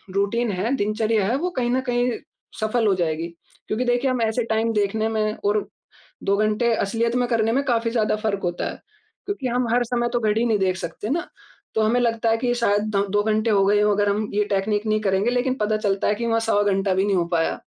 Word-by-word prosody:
Routine 210 +3 +1
है, 200 +8 -1
दिनचर्या 215 0 0
है, 240 - +1
वो 360 +4 -1
कहीं 240 -1 0
न 260 +1 +1
कहीं 245 0 +1 0.5
सफल 220 +1 +1
हो 195 - +4
जाएगी। 165 -1 -1 0.4
क्योंकि 245 +4 -1
देखिए, 245 +2 +1
हम 250 -2 -1
ऐसे 225 +2 0
टाइम 225 0 0
देखने 215 +1 0
में 215 -1 0
और 205 0 +1 0.6
2 200 0 +2
घंटे 215 +3 +1
असलियत 230 +4 0
में 245 -1 +1
करने 225 -1 +1
में 275 +3 +2
काफ़ी 230 -2 0
ज़्यादा 215 -2 +1
फ़र्क 210 -2 -2
होता 175 0 -2
है। - - -8 0.5
क्योंकि 400 -10 -3
हम 245 0 0
हर 245 0 +3
समय 240 0 -1
तो 240 - +2
घड़ी 220 +1 +1
नहीं 215 -3 +2
देख 185 -1 +1
सकते 185 +4 -6
ना, 340 +4 -1 0.5
तो 220 - +1
हमें 235 +3 +2
लगता 230 -1 +1
है 225 - +3
कि 250 - -2
ये 245 - +2
शायद 205 -4 +1
द 200 - +2
दो 205 0 +2
घंटे 220 +1 +1
हो 195 -2 +4
गए 205 +1 +3
हों, 210 0 +3
अगर 205 0 +1
हम 210 +1 0
ये 210 0 +2
टेकनीक 205 +2 0
नहीं 215 0 +1
करेंगे। 195 +3 +1
लेकिन 250 +1 0
पता 215 +1 +1
चलता 200 -2 0
है 210 - +2
कि 235 +1 -3
वहाँ 225 0 +1
सवा 205 - +3
घंटा 195 -1 +1
भी 190 +1 +2
नहीं 195 -2 +1
हो 175 - +2
पाया। 165 - 0
215 Hz, 240 wpm, -23 LUFS, 205-235 Hz, 0.6 s, हो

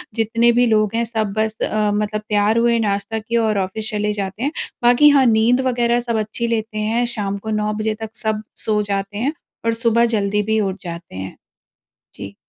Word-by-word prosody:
जितने 230 +1 +3
भी 245 +1 +3
लोग 215 -2 +2
हैं 235 - +1
सब 220 -3 -2
बस 220 0 0
अ, 210 -1 +1
मतलब 210 0 -1
तैयार 210 +2 +2
हुए, 235 0 +3
नाश्ता 205 +1 -1
किए 235 +2 -2
और 220 -2 +1
ऑफ़िस 215 +4 -2
चले 210 0 -1
जाते 200 +3 -4
हैं। 290 - 0 0.3
बाकी 245 +5 +6
हाँ 275 -2 +5
नींद 235 +2 +3
वग़ेेरह 240 -1 +2
सब 235 -2 -2
अच्छी 215 +2 -2
लेते 220 -1 -2
हैं। 225 +3 0
शाम 200 -1 -2
को 220 +2 -7
9 210 0 0
बजे 215 0 -1
तक 220 0 -7
सब 215 0 -2 0.2
सो 210 -1 +2
जाते 195 +1 -2
हैं 275 +7 -1 0.3
और 230 - +2
सुबह 230 0 +3
जल्दी 205 0 +1
भी 220 +1 +1
उठ 195 -2 -1
जाते 170 - -8
हैं। 95 0 -6 0.8
जी। 100 0 -8
220 Hz, 200 wpm, -20 LUFS, 210-230 Hz, 0.8 s, बाकी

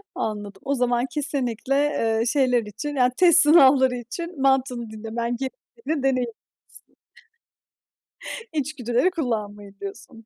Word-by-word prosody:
Anladım. 205 -2 -5
O 280 - 0
zaman 245 0 +1
kesinlikle, 265 -4 -2
eee, 230 -6 +1
şeyler 250 -3 +2
için, 280 +8 -6
yani, 250 -1 +3
test 350 -3 +6
sınavları 265 -4 +6
için 280 +6 -7
mantığını 255 -4 +1
dinlemen 230 +2 -4
gerektiğini 305 - -5
deneyimlemişsin. 255 -4 0 2.1
İçgüdüleri 280 +1 0
kullanmayın 210 - -4
diyorsun. 215 +3 -9
250 Hz, 105 wpm, -23 LUFS, 225-280 Hz, 2.1 s, test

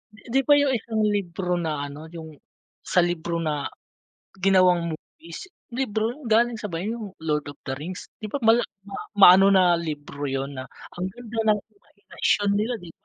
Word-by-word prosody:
Di 210 - -18
di 270 - +5
ba 290 - +7
yung 280 -2 +2
isang 220 0 -3
libro 180 -2 -2
na 155 -4 -2
ano, 145 +3 -9
yung 160 -1 -8 0.6
sa - - +5
libro 170 -1 -2
na 150 -2 -1 0.8
ginawang 180 -3 +4
movies, 165 - -10 0.2
libro 230 -3 -1
yun 270 0 -10
galing 230 +1 +3
sa 210 - -4
ba 165 +1 -3
yung 215 -2 -5
Lord 150 -2 -1
of 145 0 -9
the 135 - -2
Rings, 180 +5 -7
di 215 - -6
ba - - 0
ma 225 - +6
mala - - +1 0.6
maano 190 0 +9
na 190 -1 +6
libro 145 -3 -5
yun 135 0 -3
na 130 - -6 0.3
ang 180 +1 -3
ganda 240 -2 -8 0.2
ng 210 - -4 0.2
imahinasyon 205 0 -1
nila, 225 +4 0
di 175 - -10
ba? - - -12
180 Hz, 185 wpm, -24 LUFS, 160-220 Hz, 0.8 s, maano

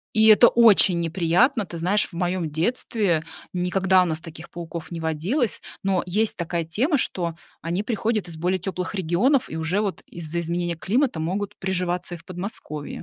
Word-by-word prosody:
И 220 0 +5
это 220 +2 +8
очень 205 -6 +5
неприятно. 180 - +2
Ты 170 -2 -8
знаешь, 190 +5 +2
в - - -15
моем 175 -1 -1
детстве, 175 -1 0 0.3
никогда 185 +1 +3
у - - +2
нас 160 -1 -1
таких 165 0 -11
пауков 170 -1 -7
не 165 -1 -5
водилось. 175 - -1 0.2
Но 190 -2 +1
есть 210 +5 0
такая 170 -1 -2
тема, 255 - +1
что 170 -7 -2 0.3
они 175 +5 -1
приходят 215 -3 -1
из 165 - -8
более 180 +3 0
тёплых 185 +1 -4
регионов, 195 - +2
и 160 - -6
уже 160 +6 0
вот 195 -6 -3
из-за 170 0 -4
изменения 170 0 -2
климата 230 - 0
могут 190 +5 -3
приживаться 180 -2 -2
и - - -8
в - - -18
Подмосковье. 180 -5 -6
180 Hz, 175 wpm, -24 LUFS, 170-205 Hz, 0.3 s, это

